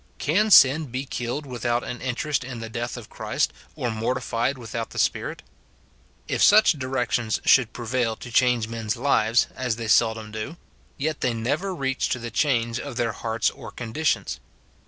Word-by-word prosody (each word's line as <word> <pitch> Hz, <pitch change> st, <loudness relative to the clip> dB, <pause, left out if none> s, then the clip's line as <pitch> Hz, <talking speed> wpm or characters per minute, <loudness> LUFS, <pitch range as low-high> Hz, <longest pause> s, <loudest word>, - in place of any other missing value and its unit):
Can 205 Hz, +9 st, +2 dB
sin 150 Hz, -3 st, +7 dB
be 130 Hz, +2 st, -4 dB
killed 125 Hz, +3 st, -4 dB
without 120 Hz, -2 st, -1 dB
an 125 Hz, -, -6 dB
interest 130 Hz, +3 st, -1 dB
in 125 Hz, -1 st, -7 dB
the 115 Hz, 0 st, -7 dB
death 120 Hz, +2 st, -4 dB
of 120 Hz, -, -9 dB
Christ, -, -, -1 dB, 0.2 s
or 120 Hz, -, -2 dB
mortified 120 Hz, +3 st, -1 dB
without 115 Hz, -1 st, -5 dB
the -, -, -11 dB
Spirit? -, -, -1 dB, 0.8 s
If -, -, -1 dB
such 215 Hz, +1 st, +7 dB
directions 125 Hz, -5 st, -1 dB
should 125 Hz, -4 st, +5 dB
prevail 120 Hz, -1 st, -1 dB
to 120 Hz, -, -10 dB
change 120 Hz, -2 st, +3 dB
men's 115 Hz, -1 st, -3 dB
lives, 120 Hz, -3 st, +3 dB
as 125 Hz, -3 st, -1 dB, 0.2 s
seldom 110 Hz, -2 st, +2 dB
they 110 Hz, -, -5 dB
do, 160 Hz, +10 st, -6 dB, 0.4 s
yet 155 Hz, +2 st, -2 dB
they 120 Hz, -2 st, +1 dB
never 145 Hz, +12 st, -1 dB
reach 135 Hz, -4 st, -1 dB
to 135 Hz, -, 0 dB
the 120 Hz, -1 st, -6 dB
change 120 Hz, -3 st, +1 dB
of 140 Hz, -4 st, -6 dB
their 115 Hz, -1 st, 0 dB
hearts 110 Hz, -1 st, -1 dB
or -, -, -10 dB
conditions. 125 Hz, -, -2 dB
120 Hz, 170 wpm, -24 LUFS, 115-135 Hz, 0.8 s, sin